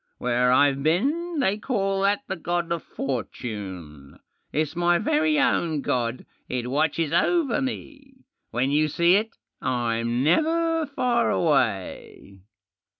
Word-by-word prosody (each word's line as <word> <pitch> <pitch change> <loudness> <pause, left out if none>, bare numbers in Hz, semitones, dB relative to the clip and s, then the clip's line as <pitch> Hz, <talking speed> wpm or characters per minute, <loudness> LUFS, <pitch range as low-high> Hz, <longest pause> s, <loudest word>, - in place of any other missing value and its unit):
"Where 125 0 +1
IVe 140 +1 +3
been 285 - 0
they 205 -3 +1
call 195 -5 -1
that 200 +6 +1
the 190 - -3
God 175 0 -2
of 170 -1 -1
Fortune. 95 - -6 0.3
It's 155 +2 -1
my 175 0 +3
Very 310 - +1
ovttl 170 - +1
god. 120 0 -2 0.2
It 125 -1 -3
watches 155 +2 0
over 295 - +2
me. 270 0 -7 0.3
When 125 +4 0
you 155 +1 +3
see 170 +4 +3
it 220 +2 -1 0.3
I'm 120 -1 -1
never 325 - +2
far 250 -4 +1
away." 105 - -1
165 Hz, 125 wpm, -24 LUFS, -, 0.3 s, IVe